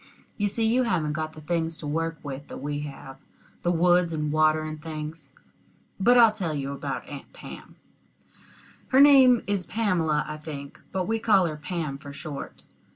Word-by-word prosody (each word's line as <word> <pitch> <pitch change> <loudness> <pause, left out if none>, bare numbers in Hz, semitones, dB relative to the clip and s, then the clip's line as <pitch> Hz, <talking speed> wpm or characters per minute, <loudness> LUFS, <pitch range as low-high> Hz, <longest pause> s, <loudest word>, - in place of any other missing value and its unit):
You 205 - 0
see, 225 +3 -1
you 235 +3 +3
haven't 170 -11 0
got 155 0 -3
the 155 - -11
things 165 0 -2
to 160 - -7
work 165 +2 -2
with 140 0 -7
that - - -8
we 145 +2 -3
have 135 -2 -8 0.4
the 175 - +1
woods 175 0 +3
and 150 -2 -2
water 155 0 +3
and 155 0 -6
things. 155 -1 -7 0.7
But 245 +6 +5
I'll 230 -2 +8
tell 180 -8 -3
you 140 -1 -3
about 140 - -5
Aunt - - -9
Pam - - -11 1.1
her 260 - +4
name 265 -4 +7
is 200 -2 -1
Pamela, 170 -9 +1
I 150 - -5
think, 145 -2 -9
but 185 -1 -1
we 225 +1 0
call 205 -5 +4
her 155 -2 -2
Pam 150 -2 -4
for 140 0 -9
short. 145 -1 -8
160 Hz, 180 wpm, -26 LUFS, 150-195 Hz, 1.1 s, I'll